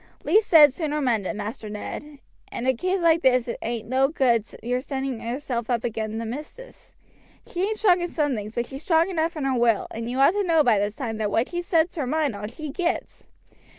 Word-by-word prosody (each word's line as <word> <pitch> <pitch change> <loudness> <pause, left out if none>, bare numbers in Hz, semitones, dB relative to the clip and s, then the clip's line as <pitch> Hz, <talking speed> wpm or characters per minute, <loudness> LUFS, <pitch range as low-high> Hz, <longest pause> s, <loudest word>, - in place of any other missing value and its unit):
Least 430 +1 +3
said 300 -5 +7
sooner 300 -1 -2
mended, 225 -7 0
Master 215 +1 -6
Ned; 285 +8 -7 0.3
in 240 - -4
a 260 - +3
case 370 +9 -1
like 335 -1 +4
this 255 -3 +3
it 235 - -4
ain't 230 -1 -4
no 260 +2 +3
good 250 -7 +2 0.2
your 250 +2 -1
setting 265 -3 -4
yourself 240 -1 -4
up 240 -2 0
agin 220 -1 -3
the 230 - -3
missis. 300 - -9 0.5
She 355 - -5
ain't 435 0 -2
strong 370 -5 +4
in 350 - -1
some 300 -5 -1
things, 215 -1 -5
but 240 - -1
she's 270 +3 -8
strong 330 +2 +2
enough 330 -1 -1
in 300 - -3
her 270 -1 +1
will, 230 -3 +2
and 230 +1 -5
you 250 - -3
ought 275 +4 +6
to 410 - 0
know 330 -5 +3
by 230 -6 +3
this 205 +1 -1
time 230 -4 -4
that 215 -1 -1
what 225 +4 0
she 350 0 -3
sets 340 -1 +1
her 280 -5 -1
mind 300 -4 0
on 205 +1 -5
she 300 +5 -7
gets. 345 +3 -3
265 Hz, 225 wpm, -24 LUFS, 230-320 Hz, 0.5 s, said